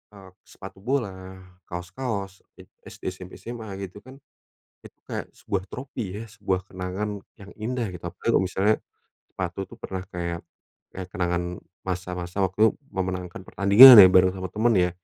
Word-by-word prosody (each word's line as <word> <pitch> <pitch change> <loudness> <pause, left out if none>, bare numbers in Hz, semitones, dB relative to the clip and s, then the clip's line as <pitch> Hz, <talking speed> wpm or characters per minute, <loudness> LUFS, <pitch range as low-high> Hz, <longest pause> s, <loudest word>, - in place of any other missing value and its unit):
eee, 95 -1 -13 0.2
sepatu 95 0 -12
bola, 95 -7 -3 0.3
kaos-kaos 95 +2 -5 0.2
e - - -12 0.2
SD, - - -9
SMP, 95 0 -11
SMA 115 -2 -8 0.2
gitu 95 +3 -14
kan. 130 +1 -13 0.7
Itu - - -15
kayak - - -5
sebuah 95 -2 -3
trofi 120 -7 -6
ya, - - -6
sebuah 95 -3 -2
kenangan 95 +3 -4 0.2
yang 100 0 -12
indah 120 +1 -2
gitu. 85 - -12
Apalagi 90 - -9
kalau - - +4
misalnya 95 +3 +2 0.5
sepatu 95 0 -5
itu - - -13
pernah 95 -1 -5
kayak 85 -2 -4 0.5
kayak 95 -1 -7
kenangan 90 -1 0 0.4
masa-masa 90 0 -4
waktu 105 +4 +2 0.2
memenangkan 90 -1 -4
pertandingan 105 +7 +10
ya, 95 - +11
bareng 95 0 +5
sama 95 0 -5
temen 115 +2 +2
ya, 90 0 +3
95 Hz, 150 wpm, -25 LUFS, 90-105 Hz, 0.7 s, ya